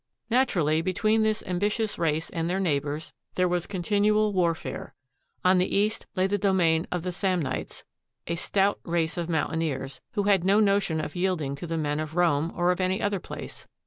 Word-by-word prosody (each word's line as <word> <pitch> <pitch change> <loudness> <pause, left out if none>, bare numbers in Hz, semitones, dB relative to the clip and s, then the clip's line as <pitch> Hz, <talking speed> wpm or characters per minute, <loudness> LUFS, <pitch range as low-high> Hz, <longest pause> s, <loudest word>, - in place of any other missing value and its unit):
Naturally, 170 - +2
between 215 +5 +1
this 220 0 +1
ambi 185 +2 0
tious 220 0 -2
race 160 -1 0
and 165 0 -2
their 185 +2 0
neighbors 150 -3 -1 0.2
there 180 0 +3
was 175 -1 -1
continual 205 +2 +2
warfare. 170 -6 -1 0.5
On 185 0 +5
the 180 - 0
east 210 +2 0
lay 185 - +2
the 205 +1 0
domain 180 -4 +2
of 180 -2 -2
the 180 - -2
Samnites, 180 -6 -2 0.4
a 170 - -2
stout 195 +4 +1
race 165 -2 0
of 170 -1 -3
mountaineers, 160 -4 -2
who 205 - 0
had 195 -3 +3
no 195 +3 +4
notion 195 -6 +2
of 155 - -5
yielding 175 -6 0
to 175 - -6
the 165 0 -2
men 150 -1 -1
of 155 0 -5
Rome 165 -2 +2
or 175 0 +2
of 180 - -1
any 185 +1 +1
other 200 -1 0
place. - - -9
180 Hz, 185 wpm, -27 LUFS, 160-200 Hz, 0.5 s, On